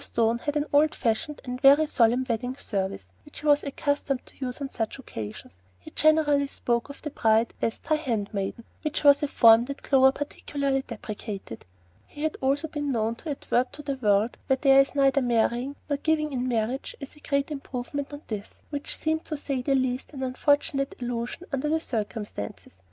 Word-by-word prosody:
Stone 230 0 +1
had 290 +4 -2
an 295 - 0
old 300 +2 +4
fashioned 275 +6 -1
and 250 0 -5
very 285 +3 +7
solemn 245 -2 +3
wedding 245 +2 -2
service 195 -7 -3
which 295 - -12
he - - -9
was 290 -1 +5
accustomed 280 -1 -1
to - - -16
use 250 +1 -4
on 280 - -3
such 225 -3 -3
occasions. 105 - -8 0.2
He 90 - -13
generally 300 -2 +3
spoke 240 -2 -1
of 280 - -11
the 300 - -4
bride 225 -2 +2
as 225 - 0
"Thy 310 - 0
handmaiden," 220 -6 -3 0.2
which 305 -1 -2
was 285 -1 +7
a 295 - +1
form 230 -3 +6
that 280 +2 -7
Clover 265 -1 +5
particularly 280 -1 -2
deprecated. 205 - -7 0.4
He 295 - -8
had 315 - 0
also 275 +4 +1
been 295 -2 -3
known 225 -2 0
to 320 - -8
advert 255 -3 0
to 295 - -9
the 280 -1 -2
world 215 -2 +2
where 265 - +3
there 275 -1 +7
is 275 - -2
neither 275 0 +4
marrying 245 +2 +1
nor 285 -1 0
giving 305 0 0
in 250 -1 -1
marriage 240 +2 -1
as 275 - -9
a - - -16
great 280 0 -1
improvement 275 0 -4
on 290 +1 -8
this, 210 -2 -6 0.2
which 285 -1 -4
seemed, 315 0 -1
to 305 - -4
say 275 -2 -2
the 275 +2 +1
least, 260 +2 -1
an 265 -2 -5
unfortunate 275 +2 +1
allusion 240 +6 -4
under 275 +2 0
the 320 +1 +2
circumstances. 210 - -5
270 Hz, 190 wpm, -26 LUFS, 235-290 Hz, 0.4 s, very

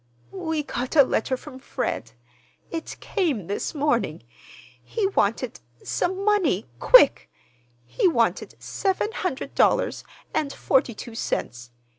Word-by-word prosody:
"We 320 -5 -2
got 255 0 -4
a 285 - +9
letter 260 0 0
from 260 -1 -11
Fred. 115 - -4 0.6
It 325 -1 -5
came 305 - -1
this 205 - -3
morning. 295 0 0 0.6
He 440 -3 -2
wanted, 240 - 0 0.2
some 380 +2 -1
money—quick. 410 - +4 0.6
He 120 - +1
wanted 340 - +1
seven 390 +2 -1
hundred 280 - -3
dollars - - +2 0.3
and 285 -2 0
forty 265 -5 +1
two 235 +2 -8
cents. 120 - -3
285 Hz, 115 wpm, -24 LUFS, 235-370 Hz, 0.6 s, a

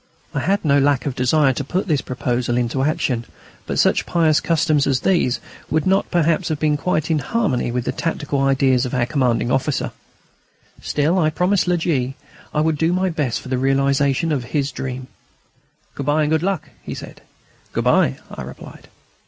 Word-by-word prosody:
I - - -1
had 195 +2 0
no 145 -1 +4
lack 140 -1 +2
of 140 - -1
desire 135 +2 +3
to 140 - -3
put 180 +8 -2
this 150 -5 +1
proposal 120 -1 -1
into 125 +2 0
action, 130 -4 0 0.4
but - - -2
such - - +2
pious 160 -3 +3
customs 155 -3 +1
as 135 -2 +1
these 170 -10 +2 0.3
would 155 0 +1
not 190 +1 +2
perhaps 170 0 +1
have 155 - -1
been 150 -1 +2
quite 155 0 -1
in 155 - +2
harmony 135 - 0
with 125 0 -2
the - - 0
tactical 150 -4 -2
ideas 135 -2 +3
of 125 0 -3
our 120 -1 +2
commanding 125 -3 0
officer. 135 +2 0 0.9
Still 155 +5 +1
I 155 -3 +3
promised 180 +4 +1
La 180 - +3
G. 135 -6 -1 0.4
I 150 - +1
would 155 -1 0
do 165 +2 +2
my 185 0 +1
best 145 -7 -1
for - - -10
the 130 -1 0
realisation 140 +3 +2
of 135 -5 -1
his 140 +2 -1
dream. 130 0 -5 0.9
"Good 140 - -6
bye 150 +1 +3
and 150 - 0
good 160 -1 +2
luck!" 190 -2 -2
he - - -6
said. - - -10 0.5
"Good - - -1
bye," 65 - +3
I - - -7
replied. - - -10
145 Hz, 190 wpm, -20 LUFS, 130-160 Hz, 0.9 s, no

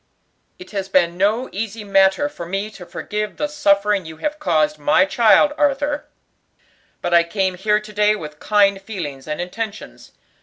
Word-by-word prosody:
"It 365 - -13
has 195 -2 -4
been 175 -2 +2
no 210 +7 +1
easy 220 +2 -5
matter 195 +6 +3
for 170 - -8
me 195 +4 -3
to 180 -4 -12
forgive 210 0 -4
the 295 - -1
suffering 205 -9 +2
you 160 -1 -10
have 300 - -3
caused 155 - +1
my 150 +5 +4
child, 235 +8 +4
Arthur; 290 0 0 1.0
but 175 - -1
I 170 - +7
came 190 +2 -1
here 210 +3 +1
to 215 0 -12
day 210 +1 +3
with 150 -6 -9
kind 200 -2 +2
feelings 160 -10 -7
and 150 0 -4
intentions. 210 +4 -6
200 Hz, 165 wpm, -20 LUFS, 180-220 Hz, 1.0 s, I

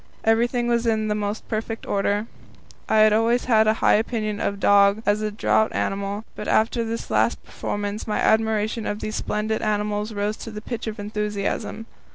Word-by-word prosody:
Everything 240 +2 +2
was 235 0 +1
in 220 -1 +1
the - - +2
most 210 0 -3
perfect 225 0 -4
order. 205 +1 0 0.6
I 220 - +3
had 215 0 +6
always 230 +3 +2
had 220 -3 +4
a 215 - +4
high - - +6
opinion 215 -1 0
of - - 0
the 200 - -14
dog 200 +1 +5
as 205 +1 +2
a 215 - -1
draught 220 +1 +1
animal, 200 +2 -2
but 210 - -6
after 230 +2 +2
this 230 0 -5
last - - +1
performance 205 +1 -4
my 210 - -1
admiration 220 0 +1
for 205 - -1
these 215 +1 -5
splendid 215 +1 -2
animals 210 0 -1
rose 210 0 -2
to - - -8
the 215 -1 -6
pitch 230 +1 -5
of 220 0 -4
enthusiasm. 210 +1 -3
215 Hz, 190 wpm, -23 LUFS, 210-225 Hz, 0.6 s, had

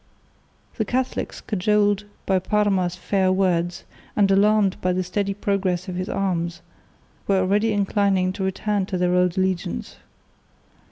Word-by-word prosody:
The 220 - +1
Catholics, 255 +3 -2
cajoled 205 0 +1 0.2
by 190 -1 +2
Parma's 190 -3 +1
fair 190 0 +1
words, 175 -2 0 0.3
and 200 -2 +3
alarmed 205 0 +3
by 180 0 +1
the 185 +1 0
steady 195 +2 -2
progress 195 -3 -1
of 185 - -4
his 185 +2 -4
arms, 170 -3 -2 0.6
were 195 - +3
already 205 +4 +2
inclining 195 -2 +1
to 190 - -4
return 195 +1 -1
to 185 - -2
their 180 0 +1
old 180 0 +2
allegiance. 185 - -2
190 Hz, 135 wpm, -23 LUFS, 180-205 Hz, 0.6 s, and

